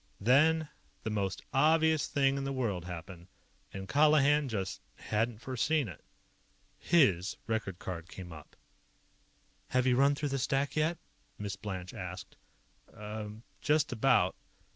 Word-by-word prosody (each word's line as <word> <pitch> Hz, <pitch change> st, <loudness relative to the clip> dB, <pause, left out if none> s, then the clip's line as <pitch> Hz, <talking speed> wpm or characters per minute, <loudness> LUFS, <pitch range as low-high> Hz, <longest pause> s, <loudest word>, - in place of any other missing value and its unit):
Then, 150 Hz, +8 st, +4 dB, 0.4 s
the 110 Hz, -, -2 dB
most 100 Hz, -2 st, -2 dB
obvious 160 Hz, +2 st, +4 dB
thing 135 Hz, -1 st, +2 dB
in 140 Hz, -, -2 dB
the 135 Hz, -, -2 dB
world 110 Hz, -10 st, -2 dB
happened 90 Hz, 0 st, -8 dB, 0.4 s
and 95 Hz, 0 st, -7 dB
Colihan 150 Hz, 0 st, +4 dB
just 95 Hz, -5 st, -3 dB
hadn't 115 Hz, +1 st, -1 dB
foreseen 135 Hz, +2 st, 0 dB
it. 85 Hz, -7 st, -10 dB, 0.8 s
His 100 Hz, -, +3 dB
record 110 Hz, -5 st, -2 dB
card 90 Hz, -2 st, -6 dB
came 90 Hz, -3 st, -9 dB
up. 75 Hz, -2 st, -13 dB, 1.1 s
"Have 130 Hz, 0 st, +1 dB
you 125 Hz, -1 st, +4 dB
run 140 Hz, +1 st, +4 dB
through 145 Hz, 0 st, -2 dB
the 135 Hz, 0 st, -1 dB
stack 135 Hz, +3 st, 0 dB
yet?" 155 Hz, +2 st, +1 dB, 0.4 s
Miss 100 Hz, -1 st, -4 dB
Blanche 95 Hz, -3 st, -6 dB
asked. 90 Hz, +1 st, -7 dB, 0.6 s
"Er 105 Hz, 0 st, -6 dB, 0.3 s
just 150 Hz, 0 st, +2 dB
about." 110 Hz, -, +3 dB
115 Hz, 135 wpm, -31 LUFS, 95-145 Hz, 1.1 s, Then